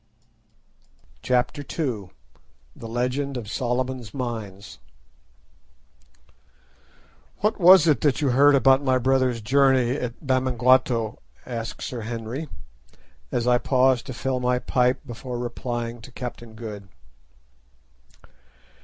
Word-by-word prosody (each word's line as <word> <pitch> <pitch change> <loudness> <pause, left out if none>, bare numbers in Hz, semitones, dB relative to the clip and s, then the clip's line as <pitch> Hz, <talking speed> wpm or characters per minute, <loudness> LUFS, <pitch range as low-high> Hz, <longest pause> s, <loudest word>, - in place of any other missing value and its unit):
CHAPTER 125 +3 0
II. 125 - -4 0.7
THE 115 - -9
LEGEND 125 +4 -2
OF 115 -4 -6
SOLOMON'S 125 -1 -3
MINES 110 -6 -6 2.6
"What 210 +2 +1
was 180 -1 +8
it 155 -4 +3
that 145 -3 +2
you 145 -3 +1
heard 140 +3 +5
about 135 +1 +4
my 130 -2 +2
brother's 130 -2 +1
journey 130 +1 +3
at 125 +2 -6
Bamangwato?" 130 -3 +2 0.3
asked 115 -2 -5
Sir 120 -2 -5
Henry, 115 +6 -5 0.8
as 120 -1 -1
I 125 0 +3
paused 130 -1 +2
to 130 - -5
fill 130 +1 -2
my 125 0 +1
pipe 125 +1 0
before 125 0 -6
replying 120 -1 -4
to 125 - -12
Captain 120 -2 -8
Good. 105 -3 -8
125 Hz, 110 wpm, -24 LUFS, 120-130 Hz, 2.6 s, was